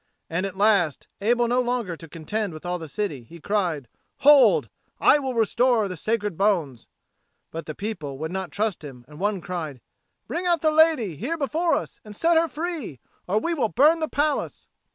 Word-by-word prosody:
And 180 +4 0
at 190 -1 -9
last, 200 -7 +2
able 240 +3 +2
no 245 +2 +2
longer 240 -7 -2
to 165 -1 -13
contend 195 +5 -3
with 155 +2 -10
all 180 0 -2
the 160 - -7
city, 155 -4 -3
he 170 +9 -14
cried, 170 - -1 0.3
"Hold! 290 -1 +6 0.3
I 295 - +5
will 265 -3 -3
restore 230 0 +2
the 185 - -5
sacred 210 +2 -1
bones!" 170 - 0 0.6
But 165 +1 -6
the 155 - -5
people 160 -10 -5
would 160 +3 -4
not 190 -1 -3
trust 205 -3 -2
him 125 -4 -10
and 150 +1 -13
one 200 -1 -1
cried, 160 -8 -5 0.5
"Bring 360 +1 -3
out 340 -3 +2
the 310 - +3
lady 305 - +3
here 295 - -3
before 320 +4 +1
us - - -5
and 210 -1 -11
set 335 +8 +2
her 330 +1 +4
free, 315 - -5 0.3
or 195 +4 +1
we 335 +10 0
will 250 -9 0
burn 300 +9 +4
the 315 - -2
palace." 295 +1 -1
210 Hz, 195 wpm, -24 LUFS, 170-270 Hz, 0.6 s, Hold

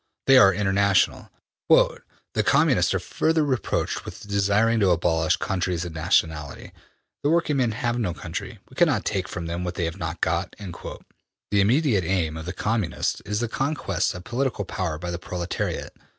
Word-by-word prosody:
They 135 -1 +7
are 95 -5 +7
international. 100 0 +1 0.4
``The - - +5 0.4
Communists - - +3
are - - +1
further 160 -1 +1
reproached 130 -8 -1
with - - -10
desiring 100 +3 +2
to 100 -3 +3
abolish 80 -2 +2
countries 90 -2 -2
and 85 - -6
nationality. 80 -3 -1 0.5
The 145 - +1
working 160 -3 +2
men 120 -4 +1
have 120 +1 -1
no 90 -7 -1
country. - - -6
We - - -19
cannot - - +2
take 95 -1 -1
from 85 -4 -5
them 85 +2 -3
what 90 0 -4
they 85 - -1
have 85 +2 -4
not 80 +1 -4
got.'' 85 +2 -1
The 100 +1 -5
immediate 115 - +3
aim 80 -3 0
of 80 +1 -7
the - - -2
Communists 105 -2 -1
is 105 +2 -1
the 120 - 0
conquests 140 -2 -1
of 90 - -8
political 120 -3 -2
power 90 -4 -3
by 85 +2 -5
the 85 - -4
proletariat. 90 -1 -4
95 Hz, 170 wpm, -24 LUFS, 85-115 Hz, 0.5 s, They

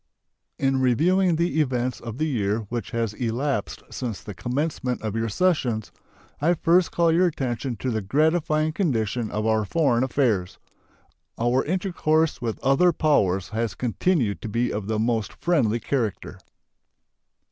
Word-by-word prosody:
In 135 -1 +1
reviewing 170 +8 +3
the 170 -1 +1
events 125 -3 -1
of 115 0 -7
the 155 - 0
year 110 -7 0
which 120 -1 -4
has 115 -3 -2
elapsed 125 +5 -2
since 120 -6 -4
the 105 - -7
commencement 125 - -2
of 110 -1 -3
your 115 0 -1
sessions, 125 - 0 0.5
I 170 +4 +3
first 175 +2 +3
call 170 -1 +3
your 175 +3 +4
attention 130 -5 -3
to 130 +2 -3
the 110 -1 -1
gratifying 155 - +1
condition 120 - -1
of 105 +1 -2
our 110 -1 +2
foreign 125 0 +1
affairs. 120 -9 0 0.8
Our 120 +3 +2
intercourse 160 -4 0
with 115 -2 -2
other 135 +7 +4
powers 100 - +1
has 110 -2 -2
continued 125 - 0
to 110 - -5
be 120 +3 0
of 105 -1 -4
the 110 0 -1
most 110 -1 0
friendly 125 -10 +1
character. 115 -3 -3
125 Hz, 145 wpm, -24 LUFS, 110-155 Hz, 0.8 s, your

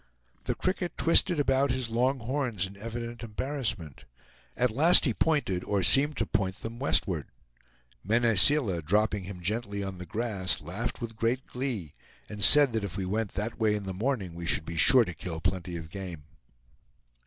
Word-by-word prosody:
The - - -2
cricket 185 -2 -3
twisted 165 0 +3
about 135 0 +2
his 125 -3 -2
long 125 +3 0
horns 120 -5 -2
in 95 +1 -10
evident 115 +2 -7
embarrassment. 115 - -5 0.5
At 125 -1 +1
last 160 +11 +5
he 125 - +1
pointed, 140 - 0
or 100 -2 -1
seemed 145 +9 +5
to - - 0
point, 95 -3 -2
them 115 +1 -7
westward. 90 - +1 0.8
Mene 115 +3 +1
Seela, 100 - +5
dropping 105 +3 0
him 90 -2 -8
gently 100 +1 -3
on 95 -2 -6
the 90 - -8
grass, 100 -8 0
laughed 95 +13 -5
with 115 -1 -6
great 120 +3 -1
glee, 120 - -5 0.3
and 105 -1 -4
said 140 +5 +7
that 110 -2 -1
if 100 +1 -5
we 95 - -3
went 105 +2 -3
that 110 +3 -4
way 110 -2 +2
in 105 - -4
the 95 -1 -5
morning 105 -3 -2
we 85 0 -7
should 80 - 0
be 85 - -6
sure 125 +8 +6
to 90 - -6
kill 80 0 -7
plenty 90 0 -3
of 80 -1 -10
game. 90 -6 -7
110 Hz, 180 wpm, -28 LUFS, 95-125 Hz, 0.8 s, said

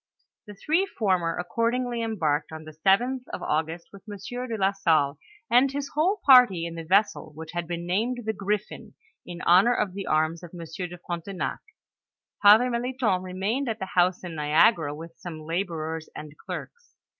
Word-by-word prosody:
The 205 - -10
three 325 - +1
former 185 - 0
a( 180 - -2
ordingly 235 +1 0
embarked 160 -10 -1
on 160 0 -8
the 155 - -10
7th 215 +11 +2
of - - -6
Au 155 - +2
gust, 165 +2 -10
with 200 - -12
Monaieur 245 +5 -6
de 230 -2 -3
la 195 -1 +2
Salle 160 -7 +1 0.3
and 250 +3 +4
his 280 0 -4
whole 345 +7 0
party 245 - +7
in 170 - -5
the 165 - -6
vessel, 200 0 +1
which 160 0 -8
had 175 -1 -4
been 170 0 -4
named 225 +8 -1
the 220 - -1
Griffin 210 +2 -4 0.3
in 175 0 -7
honor 195 +8 +5
of 200 -3 -1
the 195 0 -6
arms 160 +2 +1
of 175 0 -11
Monsieur 170 +2 -6
de 175 0 -10
Frontenac. 175 +2 -4 0.8
Father 220 +5 +7
Melithon 235 -5 0
remained 195 +9 -2
at 220 - -2
the 190 -3 -6
house 180 +1 +2
at 175 - -6
Niagara, 155 +1 +3
with 165 +2 -10
some 170 -3 -7
laborers 160 -2 -3
and 150 0 -9
clerks. 475 - -9
190 Hz, 180 wpm, -26 LUFS, 165-230 Hz, 0.8 s, party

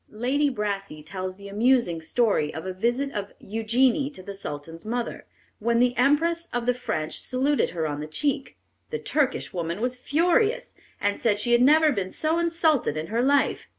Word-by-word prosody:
Lady 265 +7 +1
Brassey 200 - -3
tells 185 +2 -5
the 200 +1 -11
amusing 210 -5 +2
story 165 -4 +1
of 160 - -7
a 185 - -3
visit 240 +8 0
of 205 -5 -5
Eugenie 235 +6 +1
to 275 -11 -12
the 200 - -7
Sultan's 165 -3 -7
mother, 235 +2 -4 0.3
when 235 +2 +1
the 245 0 +3
Empress 325 +6 +2
of 240 -1 -2
the 250 - +3
French 160 -11 -3
saluted 270 +3 +1
her 165 -2 -3
on 145 -1 -3
the 150 - -5
cheek. 275 - -2 0.3
The 460 - -2
Turkish 290 - -1
woman 170 +1 -3
was 250 +2 -1
furious, 355 - +1 0.3
and 205 0 0
said 210 -3 +2
she 240 +3 -1
had 240 0 +5
never 305 +4 +6
been 195 -7 -2
so 315 - 0
insulted 325 - +1
in 155 +1 -3
her 235 - +2
life. 280 +2 +2
240 Hz, 185 wpm, -25 LUFS, 195-280 Hz, 0.3 s, never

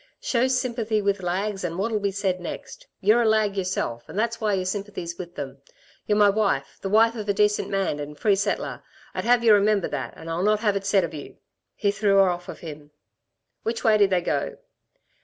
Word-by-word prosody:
Show 255 0 +1
sympathy 235 -4 0
with 200 -1 0
lags, 195 +3 -2
and 170 -1 -3
what'll 215 +2 0
be 200 0 0
said 195 -2 -1
next? - - -8
You're 215 +4 +4
a 230 - +2
lag 215 -2 +2
yourself 180 -11 -3
and - - -8
that's 230 +1 -1
why 210 -2 +1
your 185 -1 -2
sympathy's 190 -3 -4
with 175 -1 -8
them. 135 -1 -6 0.5
Y're 210 - +2
my 205 -1 +6
wife, 195 -10 -1
the 195 - -3
wife 225 +3 +5
of 210 -2 -5
a 200 - +2
decent 210 0 +2
man 195 -6 -1
and 145 0 -7
free 205 +3 +3
settler, 200 +1 -2 0.3
I'd - - -3
have 240 0 +4
y'r 225 -2 +7
remember 205 -2 +3
that, 140 -3 -4
and 160 - -10
I'll 165 +1 -2
not 210 +2 +2
have 205 -3 +2
it 195 0 -2
said 200 -2 +4
of 170 - -4
you!" 145 -2 -9 0.4
He 200 - +1
threw 200 0 +2
her 195 -1 +6
off 175 0 -5
from - - -7
him. 150 -3 -10 0.7
"Which 230 +1 -3
way 215 -2 +4
did 200 -1 +5
they 185 -2 +2
go?" - - -2
200 Hz, 220 wpm, -24 LUFS, 180-215 Hz, 0.7 s, y'r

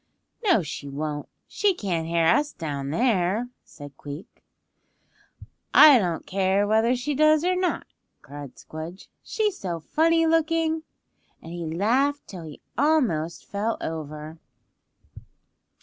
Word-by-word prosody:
"No 360 - +4
she 145 -1 -6
won't; 145 +1 -4 0.2
she 405 -3 +1
can't 170 - -2
hear 165 0 +2
us 290 - +3
down 140 -4 -4
there," 215 - +1
said 145 -2 -12
Queek. 145 +9 -10 1.3
"I 290 -5 +9
don't 175 -5 -2
care 195 +1 +1
whether 220 +4 +3
she 255 +4 -2
does 310 +2 +4
or 365 0 +2
not," 365 -1 -1 0.4
cried 140 -1 -9
Squdge, 160 +4 -9
"she's 425 -3 -1
so 175 -4 -3
funny 330 - +2
looking." 325 0 +1 0.6
And 165 - -10
he 170 -2 -5
laughed 250 - +1
till 180 -5 -9
he 150 -2 -11 0.2
almost 245 - +1
fell 210 +3 -2
over. 155 0 -6
195 Hz, 125 wpm, -25 LUFS, -, 1.3 s, I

